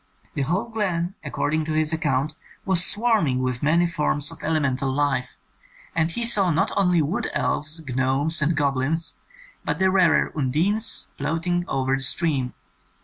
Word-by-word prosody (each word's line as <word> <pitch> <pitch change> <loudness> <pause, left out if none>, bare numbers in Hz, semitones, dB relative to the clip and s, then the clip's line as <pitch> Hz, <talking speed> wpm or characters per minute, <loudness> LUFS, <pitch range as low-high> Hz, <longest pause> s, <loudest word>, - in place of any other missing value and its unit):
The 140 - -3
whole 180 - -1
glen, 190 -6 -2
according 155 +1 -2
to 155 - -3
his 155 +1 +1
account, 150 -2 -1 0.3
was 185 -2 +5
swarming 210 - +3
with 130 -1 -2
many 165 +4 +2
forms 150 -2 -2
of 165 - -13
elemental 140 -4 -1
life, 135 -2 -1 0.6
and 165 0 +1
he 235 +7 -2
saw 205 -6 +6
not 165 0 0
only 180 -4 +2
wood 155 +7 -2
elves, 155 +2 -2
gnomes, 135 +5 -1
and 150 +2 0
goblins, 145 +3 -1 0.4
but - - -2
the 190 0 +2
rarer 185 -4 +3
undines, 150 - +1
floating 165 +4 -2
over 135 0 -1
the 135 - -4
stream. 135 -2 +1
155 Hz, 150 wpm, -23 LUFS, 135-175 Hz, 0.6 s, saw